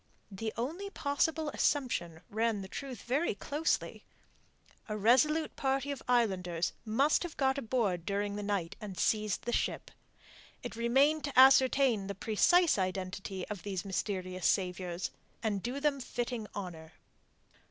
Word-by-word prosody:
The 220 +3 -4
only 330 +12 -3
possible 310 -1 0
assumption 175 - 0
ran 220 -1 0
the - - -7
truth 255 +2 -7
very 270 0 0
closely. 295 +9 -1 0.9
A 215 - -2
resolute 265 +9 +3
party 270 +1 0
of 280 - -5
islanders 185 -8 +1
must 270 +8 +3
have 350 -2 -5
got 265 0 +2
aboard 215 -9 0
during 200 +2 -2
the 205 - -3
night, 200 -5 -2
and 200 -4 -7
seized 215 +2 +1
the 240 - -2
ship. - - -1 0.7
It - - -6
remained 270 +7 +3
to 285 -3 +1
ascertain 260 -5 +6
the 200 - -4
precise 230 - +3
identity 185 0 -3
of 205 -4 -6
these 195 0 -4
mysterious 185 -2 -2
saviours, 180 -2 -1 0.3
and 205 -3 0
do 245 +6 -3
them 285 -1 +1
fitting 240 -3 -4
honour. 165 -5 -7
220 Hz, 140 wpm, -32 LUFS, 195-270 Hz, 0.9 s, ascertain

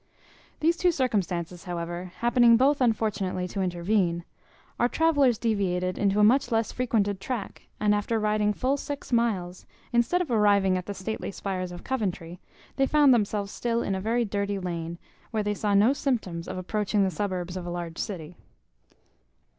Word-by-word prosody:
These 335 +2 +3
two 360 0 +3
circumstances, 185 - -2
however, 175 0 -5
happening 240 -1 +5
both 275 +3 +3
unfortunately 210 -6 0
to 195 - -3
intervene, 175 -1 0 0.5
our 240 - +3
travellers 290 -7 +3
deviated 185 -5 -1
into 200 0 +2
a - - +5
much 245 +4 +4
less 225 -1 +1
frequented 210 -6 0
track; 245 -6 -5
and 210 0 +3
after 210 +2 0
riding 210 0 +1
full 260 +6 0
six 285 -2 -6
miles, 195 -7 0 0.3
instead 240 +10 +3
of 345 -8 -2
arriving 200 -4 +4
at 180 -1 -4
the 205 - -4
stately 205 +4 -4
spires 185 -2 -4
of 175 - -9
Coventry, 185 -9 -3 0.4
they 270 -1 +3
found 290 -3 +5
themselves 205 -3 0
still 235 -1 -1
in 195 - -1
a 190 - -2
very 230 +3 +1
dirty 200 -1 -2
lane, 170 -2 -4 0.3
where 220 -2 -1
they 205 0 0
saw 205 0 0
no 215 +7 +5
symptoms 215 -12 -2
of - - -5
approaching 205 +2 0
the 190 - +1
suburbs 180 0 -3
of 180 -1 -5
a - - -3
large 175 -1 -5
city. 175 -5 -5
205 Hz, 170 wpm, -27 LUFS, 185-235 Hz, 0.5 s, happening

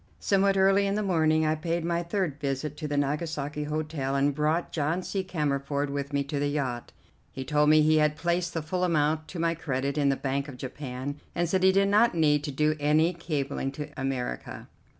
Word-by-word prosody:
Somewhat 195 0 +2
early 195 +1 +4
in 195 - 0
the 210 - 0
morning 160 -4 +2
I 155 - +2
paid 165 +2 -2
my 170 0 0
third 170 -4 -2
visit 140 +1 -3
to 150 - -4
the 145 -1 -2
Nagasaki 150 0 -2
Hotel 150 -3 -2
and 140 +1 +2
brought 155 +4 0
John 160 +4 -1
C. 195 +1 -2
Cammerford 145 -4 -1
with 140 0 -3
me 140 0 0
to 140 +1 -3
the 145 - +1
yacht. 130 -5 -3 0.4
He 130 - -6
told 150 0 +3
me 155 0 +6
he 155 +1 +4
had 150 0 +3
placed 175 +2 -1
the 165 - -1
full 180 +4 -2
amount 155 -2 +1
to 180 - -8
my 165 0 +1
credit 140 -2 -2
in 140 -1 +3
the 135 - +2
Bank 140 +1 -2
of 135 -3 -9
Japan, 130 +2 -6 0.2
and 175 0 +1
said 185 +3 +1
he 190 0 +6
did 195 +1 +3
not 215 0 +4
need 150 -3 +3
to 145 - -3
do 150 +3 +1
any 155 +4 +3
cabling 145 -5 -3
to 150 +1 -6
America. 135 -2 -4
150 Hz, 210 wpm, -27 LUFS, 140-170 Hz, 0.4 s, me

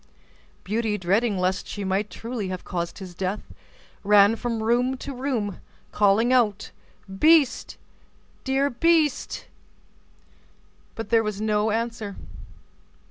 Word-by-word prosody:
Beauty, 215 +1 -1
dreading 200 +4 +1
lest 185 +1 -1
she 205 - -5
might 195 +2 -1
truly 230 -3 -5
have 185 -1 -5
caused 170 -1 -4
his 185 -2 -9
death, 190 +3 -4 0.5
ran 205 +1 +6
from 230 -1 -3
room 245 +3 +1
to 275 - -7
room, 245 -7 -3 0.3
calling 210 +4 +3
out: 210 -5 +1 0.5
"Beast, 315 -4 +4 0.7
dear 270 +1 +1
beast;" 310 +2 +1 1.5
but 225 -2 -6
there 230 -1 +4
was 210 -2 -3
no 215 0 +1
answer. 225 -2 -3
220 Hz, 115 wpm, -24 LUFS, 200-245 Hz, 1.5 s, ran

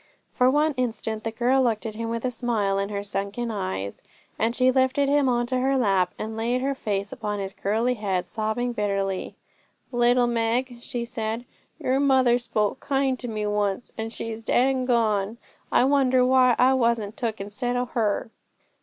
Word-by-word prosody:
For 250 0 +4
one 300 +3 +2
instant 220 -3 -2
the 225 - -1
girl 245 +4 +2
looked 230 -4 0
at 220 - -3
him 225 +1 -4
with 230 +1 -3
a 250 - 0
smile 215 -5 0
in 200 0 -2
her 200 -1 -3
sunken 205 +4 -3
eyes, 95 - -4 0.4
and - - +3
then 230 - -2
she 255 +1 +4
lifted 265 +2 +2
him 285 -1 +3
on 240 -1 +1
to 255 +1 -1
her 270 +1 +2
lap, 195 -7 +2
and 220 +1 -5
laid 235 +3 0
her 275 +1 0
face 200 -6 -3
upon 210 -2 -3
his 195 -1 -4
curly 225 +5 0
head, 190 -6 -2
sobbing 220 +4 -2
bitterly. 195 -3 -2 0.6
'Little 245 0 +3
Meg,' 240 +2 0
she 240 -1 -3
said, 230 0 -4 0.3
'your 260 +1 0
mother 260 -3 +4
spoke 225 -1 -1
kind 270 -2 0
to 245 - -5
me 215 -2 -3
once, 205 +1 -1
and 220 0 -3
now 225 - -9
she's 225 0 -5
dead 250 +3 +3
and 260 -1 -1
gone. 220 -3 +1 0.3
I - - +4
wonder 260 -2 +3
why 255 -1 +5
I 255 +1 +5
wasn't 230 -4 +1
took 225 -3 -3
instead 210 +5 -3
o' 245 0 0
her?' 225 -3 -1
235 Hz, 190 wpm, -25 LUFS, 210-255 Hz, 0.6 s, why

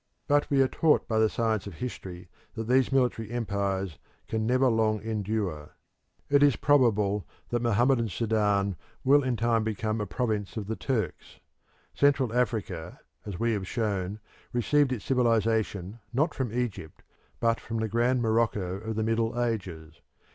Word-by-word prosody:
But 145 0 +2
we 135 -1 +4
are - - +2
taught 155 +3 +2
by 110 -1 +1
the 110 0 +4
science 110 -3 -1
of 100 - -8
history 90 -5 -7 0.3
that 115 - -3
these 130 +2 +3
military 125 -5 +1
empires 100 -7 -2 0.3
can 110 0 -1
never 130 +2 +3
long 110 -2 +2
endure. 105 -8 -3 0.5
It 140 0 +4
is 145 -4 +5
probable 105 -8 +2 0.2
that 120 -1 0
Mohammedan 120 +1 +2
Sudan 105 -2 +1 0.3
will 140 +2 +5
in 130 -3 -1
time 115 0 +2
become 110 0 -2
a 105 - -3
province 105 0 -2
of 105 - -3
the 110 +3 -3
Turks. 115 -8 -3 0.5
Central 140 -5 +2
Africa, 110 -9 -2 0.3
as 100 -4 -5
we 115 0 +1
have 100 -3 -3
shown, 100 -3 -2 0.3
received 135 +3 +2
its 115 -6 -3
civilisation 110 -5 +1
not 150 +6 +1
from 130 -5 -3
Egypt 115 -9 -4 0.4
but 115 0 +2
from 115 - -5
the 110 0 0
grand 120 +3 +1
Morocco 110 -5 0
of 110 +1 -5
the 110 - 0
Middle 115 +1 0
Ages. 90 -10 -3
110 Hz, 155 wpm, -28 LUFS, 100-120 Hz, 0.5 s, is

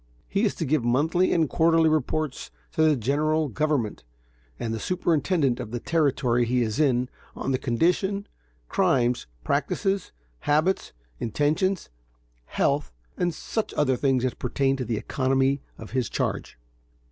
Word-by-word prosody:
He 200 - 0
has 220 - +1
to 165 - -2
give 150 -2 +1
monthly 155 +10 +2
and 165 -2 +3
quarterly 165 +1 +3
reports 155 -1 -1 0.2
to - - -1
the 155 -1 +5
General 150 +5 +1
Government 140 - -1 0.6
and 115 - -2
the 110 - -3
superintendent 160 - +1
of 110 - -5
the 120 +2 -3
Territory 130 -6 +1
he 125 +1 +1
is 110 +2 -2
in, 130 -4 +3 0.3
of 135 - -2
the 130 - +1
condition, 180 - +1 0.4
crimes, 125 - +1 0.2
practices, 195 0 0 0.3
habits, 155 +6 +1 0.3
intentions, 155 - 0 0.6
health, 140 - 0 0.2
and 175 -1 0
such 215 +7 -4
other 135 -3 +2
things 130 -1 +1
as 130 - 0
pertain 135 +2 0
to 130 - -3
the 115 -1 -1
economy 135 +3 +1 0.2
of 110 - -10
his 125 -2 0
charge. - - -2
140 Hz, 145 wpm, -26 LUFS, 125-160 Hz, 0.6 s, the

